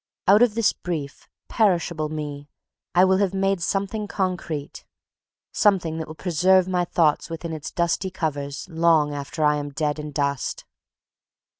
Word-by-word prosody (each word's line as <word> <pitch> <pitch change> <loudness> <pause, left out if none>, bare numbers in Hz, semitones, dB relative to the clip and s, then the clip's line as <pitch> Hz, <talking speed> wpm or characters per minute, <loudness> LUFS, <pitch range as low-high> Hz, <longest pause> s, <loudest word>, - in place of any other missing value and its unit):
Out 200 +4 +6
of 240 -3 +4
this 225 -3 +3
brief, 155 -6 -6 0.2
perishable 170 -7 +1
Me 145 -2 -6 0.5
I 180 +2 +7
will 190 0 +3
have 195 -1 0
made 195 -1 +1
something 200 +4 -2
concrete, 180 -7 -3 0.7
something 175 -6 +2
that 160 - -5
will 155 - -9
preserve 180 +2 +3
my 180 -1 0
thought 160 -3 +1
within 165 0 -5
its 155 -2 -5
dusty 170 +2 0
covers 145 -5 -4
long 160 -3 +2
after 145 +3 -4
I 150 0 +3
am 145 0 -4
dead 150 +1 -2
and 150 0 -6
dust. 140 -2 -2
165 Hz, 150 wpm, -24 LUFS, 150-190 Hz, 0.7 s, I